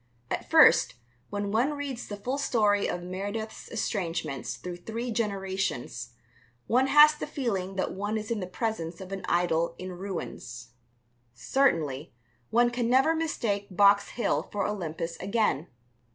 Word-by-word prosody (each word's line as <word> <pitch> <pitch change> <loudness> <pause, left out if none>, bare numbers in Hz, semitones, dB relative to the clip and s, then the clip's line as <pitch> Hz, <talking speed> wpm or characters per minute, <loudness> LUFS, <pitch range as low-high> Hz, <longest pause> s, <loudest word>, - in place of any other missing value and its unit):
At - - -3
first, - - +6 0.3
when 205 0 -3
one 250 +8 +2
reads 280 -4 -5
the 205 - -6
full 255 +7 -3
story 210 -7 +2
of 175 - -3
Meredith's 205 +4 -5
estrangements 165 - -2
through 175 +5 -7
three 230 +6 -4
generations, 195 - -2 0.5
one 255 +3 +3
has 300 +2 +8
the 300 - -6
feeling 195 -10 -2
that 190 - -1
one 205 +3 -2
is 215 +1 -5
in 230 - 0
the 185 - -4
presence 185 -4 -3
of 190 0 -9
an 195 -1 -5
idol 170 -2 +1
in 185 0 -6
ruins. 170 -11 -6 0.7
Certainly, 155 - 0 0.3
one 240 +1 +4
can 240 -1 -1
never 265 +6 +4
mistake 230 -11 -1
Box 200 0 +5
Hill 240 - -1
for 205 -1 -1
Olympus 165 -4 -3
again. 195 -5 0
200 Hz, 145 wpm, -28 LUFS, 175-235 Hz, 0.7 s, has